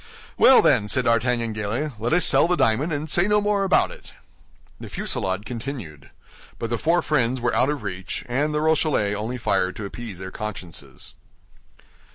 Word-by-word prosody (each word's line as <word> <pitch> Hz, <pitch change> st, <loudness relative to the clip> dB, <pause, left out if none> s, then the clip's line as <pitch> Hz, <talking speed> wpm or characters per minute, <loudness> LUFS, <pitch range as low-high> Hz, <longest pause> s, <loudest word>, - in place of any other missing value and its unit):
"Well, 265 Hz, -, +6 dB
then," 105 Hz, -7 st, +3 dB
said 125 Hz, +4 st, +2 dB
D'Artagnan, 115 Hz, -1 st, +1 dB
gaily, 110 Hz, +8 st, -3 dB
"let 115 Hz, +3 st, -2 dB
us 175 Hz, +1 st, +4 dB
sell 170 Hz, -, +4 dB
the 180 Hz, -, +2 dB
diamond, 135 Hz, +5 st, +1 dB
and 150 Hz, +1 st, -3 dB
say 175 Hz, +5 st, +2 dB
no 210 Hz, 0 st, +3 dB
more 205 Hz, -1 st, +1 dB
about 190 Hz, -, +3 dB
it." -, -, -13 dB, 0.7 s
The -, -, -9 dB
fusillade 95 Hz, +2 st, -2 dB
continued; 115 Hz, -, -7 dB, 0.5 s
but 115 Hz, -, -5 dB
the 120 Hz, -, -1 dB
four 170 Hz, +2 st, +2 dB
friends 130 Hz, -4 st, 0 dB
were 120 Hz, 0 st, -1 dB
out 130 Hz, -, +2 dB
of 145 Hz, -6 st, -3 dB
reach, 95 Hz, -2 st, -5 dB
and 140 Hz, +5 st, 0 dB
the 150 Hz, 0 st, -1 dB
Rochellais 155 Hz, -9 st, +1 dB
only 110 Hz, +5 st, -4 dB
fired 95 Hz, -5 st, 0 dB
to 105 Hz, -, -6 dB
appease 105 Hz, -1 st, -8 dB
their 95 Hz, 0 st, -7 dB
consciences. 95 Hz, -6 st, -7 dB
120 Hz, 180 wpm, -23 LUFS, 105-150 Hz, 0.7 s, Well